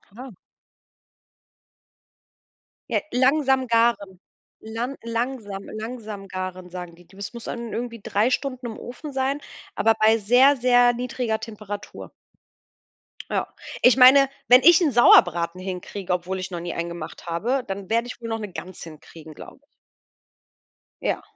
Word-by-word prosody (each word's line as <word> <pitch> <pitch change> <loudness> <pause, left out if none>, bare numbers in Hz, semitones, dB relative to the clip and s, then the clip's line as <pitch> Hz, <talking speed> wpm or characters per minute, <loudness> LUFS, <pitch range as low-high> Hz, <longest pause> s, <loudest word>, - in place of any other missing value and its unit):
Ha. 255 +1 -9 2.6
Ja, - - +1
langsam 265 +1 +2
garen. 230 -5 +1 0.4
Lan 230 +5 -4
langsam 230 -4 -4 0.2
„langsam 220 -4 -7
garen,“ 185 -1 -6
sagen 180 -1 -8
die. 175 0 -19
Die 190 - -20
das 200 +3 -7
muss 235 -1 -9
dann 235 -2 -6
irgendwie 235 -1 -5
3 210 +4 +1
Stunden 255 -1 -3
im 225 - -7
Ofen 280 +5 -9
sein, 270 +2 -1 0.3
aber 225 0 +2
bei 220 +1 +5
sehr, 250 +7 +5
sehr 245 -1 +4
niedriger 240 -2 -3
Temperatur. 210 -2 -8 1.2
Ja. - - -1 0.3
Ich 250 - +6
meine, 270 +2 +7 0.2
wenn 250 +1 +8
ich 340 +5 +7
'n 310 -5 +2
Sauerbraten 175 -7 +5
hinkriege, 185 +1 -6
obwohl 180 +1 -2
ich 185 +1 -6
noch 175 - -4
nie 170 0 -5
einen 170 0 -3
gemacht 170 0 -9
habe, 235 +11 -1
dann 195 -1 -6
werde 230 +2 +1
ich 250 - -9
wohl 230 - -6
noch 225 0 -3
'ne 210 -3 -7
Gans 185 +1 -9
hinkriegen, 160 0 -12
glaube 260 - -13
ich. - - -32 1.4
Ja. - - -1
225 Hz, 145 wpm, -23 LUFS, 190-250 Hz, 2.6 s, wenn